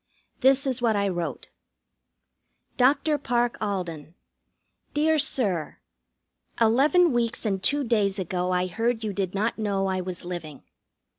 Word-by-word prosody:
This 270 Hz, +2 st, +4 dB
is 260 Hz, -2 st, -1 dB
what 230 Hz, -3 st, +2 dB
I 200 Hz, 0 st, +1 dB
wrote: 175 Hz, -3 st, -4 dB, 1.3 s
DR. 290 Hz, +4 st, +3 dB
PARKE 240 Hz, -2 st, 0 dB
ALDEN: 175 Hz, -6 st, -4 dB, 0.8 s
Dear 310 Hz, +1 st, +3 dB
Sir, 200 Hz, -, 0 dB, 0.8 s
Eleven 280 Hz, +9 st, +4 dB
weeks 235 Hz, -1 st, -1 dB
and 195 Hz, -3 st, -1 dB
two 285 Hz, +7 st, +1 dB
days 210 Hz, -5 st, +1 dB
ago 180 Hz, -1 st, -2 dB
I 180 Hz, 0 st, +1 dB
heard 225 Hz, +5 st, -1 dB
you 210 Hz, -2 st, -2 dB
did 195 Hz, -1 st, -3 dB
not 215 Hz, +3 st, -1 dB
know 200 Hz, -2 st, 0 dB
I 190 Hz, -1 st, -1 dB
was 180 Hz, -1 st, -6 dB
living. 165 Hz, -5 st, -7 dB
215 Hz, 135 wpm, -25 LUFS, 185-245 Hz, 1.3 s, This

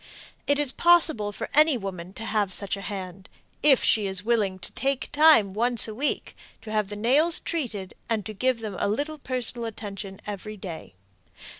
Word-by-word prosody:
It 285 Hz, -, +3 dB
is 290 Hz, -3 st, +2 dB
possible 320 Hz, -13 st, +3 dB
for -, -, -6 dB
any 305 Hz, -2 st, +5 dB
woman 185 Hz, -4 st, -6 dB
to 225 Hz, -, -8 dB
have 210 Hz, -4 st, 0 dB
such 200 Hz, +2 st, -2 dB
a 195 Hz, -, -8 dB
hand 190 Hz, -1 st, -7 dB, 0.3 s
if 280 Hz, -4 st, +5 dB
she 210 Hz, -3 st, +3 dB
is 190 Hz, 0 st, -2 dB
willing 210 Hz, -5 st, +1 dB
to 180 Hz, -, -7 dB
take 275 Hz, -1 st, -2 dB
time 290 Hz, -10 st, +5 dB
once 235 Hz, +2 st, +2 dB
a 220 Hz, -, -6 dB
week 280 Hz, +7 st, -2 dB, 0.3 s
to 215 Hz, -, -8 dB
have 215 Hz, -2 st, 0 dB
the 205 Hz, -, -5 dB
nails 285 Hz, +11 st, +3 dB
treated 220 Hz, -, -4 dB, 0.2 s
and 220 Hz, -3 st, -1 dB
to 215 Hz, -, -5 dB
give 250 Hz, +3 st, 0 dB
them 210 Hz, -3 st, -5 dB
a -, -, +1 dB
little 295 Hz, +8 st, -3 dB
personal 250 Hz, -3 st, -1 dB
attention 200 Hz, -3 st, -7 dB
each 210 Hz, +1 st, -6 dB
day. 165 Hz, -, -8 dB
215 Hz, 185 wpm, -25 LUFS, 195-265 Hz, 0.3 s, any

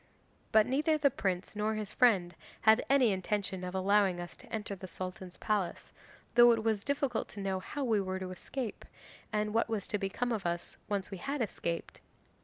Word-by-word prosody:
'But 220 Hz, -1 st, +6 dB
neither 300 Hz, +4 st, +2 dB
the 285 Hz, -2 st, +3 dB
prince 190 Hz, -3 st, -2 dB
nor 215 Hz, +1 st, 0 dB
his 215 Hz, -2 st, -3 dB
friend 195 Hz, -9 st, +4 dB, 0.3 s
had 220 Hz, +2 st, +6 dB
any 265 Hz, -5 st, +5 dB
intention 190 Hz, -1 st, -2 dB
of 180 Hz, +1 st, -4 dB
allowing 195 Hz, -1 st, +3 dB
us 175 Hz, 0 st, -7 dB
to -, -, -16 dB
enter 210 Hz, -2 st, -3 dB
the 185 Hz, 0 st, -8 dB
Sultan's 185 Hz, 0 st, -7 dB
palace, 200 Hz, -5 st, -2 dB, 0.4 s
though 240 Hz, 0 st, +8 dB
it 225 Hz, -1 st, -1 dB
was 220 Hz, -3 st, +1 dB
difficult 280 Hz, -4 st, -1 dB
to 205 Hz, -, -10 dB
know 195 Hz, -1 st, -1 dB
how 285 Hz, +9 st, -4 dB
we 220 Hz, -5 st, +2 dB
were 190 Hz, -1 st, -2 dB
to 185 Hz, -1 st, -5 dB
escape, 230 Hz, +5 st, -5 dB, 0.5 s
and 210 Hz, 0 st, 0 dB
what 230 Hz, 0 st, +2 dB
was 215 Hz, -4 st, -1 dB
to 210 Hz, -, 0 dB
become 205 Hz, +5 st, -1 dB
of 215 Hz, -4 st, -1 dB
us 170 Hz, 0 st, -3 dB
when 205 Hz, -, +1 dB
once 190 Hz, -, -12 dB
we 195 Hz, -, -6 dB
had 280 Hz, +8 st, -3 dB
escaped. 170 Hz, -5 st, -4 dB
210 Hz, 200 wpm, -32 LUFS, 185-230 Hz, 0.5 s, though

